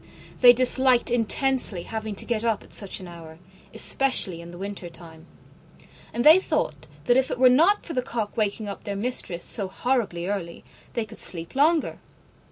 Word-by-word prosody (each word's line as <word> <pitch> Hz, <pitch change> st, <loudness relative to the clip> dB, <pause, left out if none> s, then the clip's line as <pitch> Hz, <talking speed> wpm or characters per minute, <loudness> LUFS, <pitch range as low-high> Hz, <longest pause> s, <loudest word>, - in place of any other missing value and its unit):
They 245 Hz, -, +9 dB
disliked 255 Hz, 0 st, +3 dB
intensely 245 Hz, -4 st, +1 dB
having 220 Hz, -2 st, -5 dB
to -, -, -6 dB
get 230 Hz, -2 st, -2 dB
up 225 Hz, -2 st, 0 dB
at -, -, -17 dB
such 200 Hz, -3 st, -1 dB
an 185 Hz, -, -10 dB
hour, 165 Hz, -2 st, -12 dB, 0.3 s
especially 200 Hz, -10 st, -1 dB
in 170 Hz, 0 st, -11 dB
winter 195 Hz, -2 st, -6 dB
time: 165 Hz, -1 st, -14 dB, 0.8 s
and 240 Hz, -, -2 dB
they 315 Hz, +4 st, +9 dB
thought -, -, -3 dB, 0.2 s
that 245 Hz, 0 st, +3 dB
if 265 Hz, 0 st, +1 dB
it -, -, -3 dB
were 255 Hz, 0 st, +6 dB
not 335 Hz, +11 st, +3 dB
for 330 Hz, -, -6 dB
the 255 Hz, -, 0 dB
cock 230 Hz, -4 st, -4 dB
waking 215 Hz, -1 st, -1 dB
up 200 Hz, -, -7 dB
their 200 Hz, -, -4 dB
Mistress 200 Hz, -5 st, -4 dB
so 200 Hz, -3 st, 0 dB
horribly 200 Hz, -4 st, -2 dB
early, 185 Hz, -4 st, -5 dB, 0.3 s
they 230 Hz, -, -2 dB
could 215 Hz, -, -9 dB
sleep 165 Hz, -2 st, -2 dB
longer. 310 Hz, +4 st, +1 dB
220 Hz, 175 wpm, -24 LUFS, 185-255 Hz, 0.8 s, They